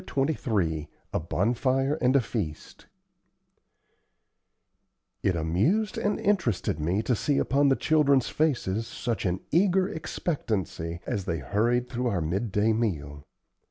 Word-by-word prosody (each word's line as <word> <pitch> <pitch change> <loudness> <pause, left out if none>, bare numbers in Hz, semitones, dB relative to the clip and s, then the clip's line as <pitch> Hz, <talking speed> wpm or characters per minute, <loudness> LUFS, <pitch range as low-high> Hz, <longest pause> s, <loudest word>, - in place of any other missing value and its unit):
CHAPTER 140 +3 0
XXIII 85 - -1 0.2
A - - +1
BONFIRE 130 - 0
AND 125 +2 +3
A 135 - +6
FEAST 100 -9 -5 2.3
It 95 - +1
amused 105 - +1
and 205 - 0
interested 170 - 0
me 90 +8 0
to 125 +2 +1
see 140 +6 0
upon 140 +1 +3
the 135 - +4
children's 140 -5 +3
faces 115 -8 0
such 115 -4 -2
an 90 +1 -1
eager 185 +2 +3
expectancy 100 - -3
as 100 -3 -2
they 85 -4 -1
hurried 115 - 0
through 125 0 -2
our 100 -6 0
midday 105 +6 0
meal. 75 -11 -3
115 Hz, 125 wpm, -27 LUFS, 90-140 Hz, 2.3 s, A